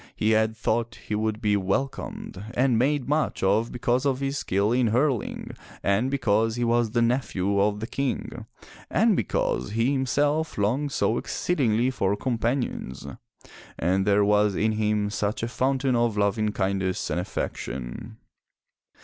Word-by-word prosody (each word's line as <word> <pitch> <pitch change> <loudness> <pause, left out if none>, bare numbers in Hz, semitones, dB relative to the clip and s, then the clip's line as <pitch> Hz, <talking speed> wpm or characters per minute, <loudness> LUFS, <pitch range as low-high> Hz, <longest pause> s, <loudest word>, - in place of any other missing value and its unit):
He 110 - +1
had 110 0 +2
thought 115 +2 -1
he - - -4
would 110 +1 -1
be 105 -2 +2
welcomed 100 -1 -3
and 125 -2 +3
made 140 +1 +1
much 150 -5 0
of 105 +5 +2
because 125 +1 0
of 135 -2 +1
his 140 0 -2
skill 100 +3 0
in 125 0 +3
hurling, 125 +1 0 0.3
and 100 +6 +2
because 115 -4 +1
he 120 - -1
was 120 -1 +2
the 120 +1 +1
nephew 100 -5 +1
of 105 +1 +1
the - - -2
King, 135 +2 -3 0.4
and - - +3
because 65 - -1
he 115 +4 +2
himself 145 +3 0
longed 125 +8 0
so - - +1
exceedingly 125 -7 0
for 100 -5 0
companions, 115 - -2 0.7
and 95 +4 +1
there 100 0 +4
was 105 -1 +3
in 110 +4 +1
him 105 -1 0
such 105 +1 -2
a - - 0
fountain 130 +1 0
of 120 -3 +1
loving 105 +1 +1
kindness 95 -2 -1
and - - 0
affection. 90 - -5
110 Hz, 150 wpm, -25 LUFS, 105-130 Hz, 0.7 s, there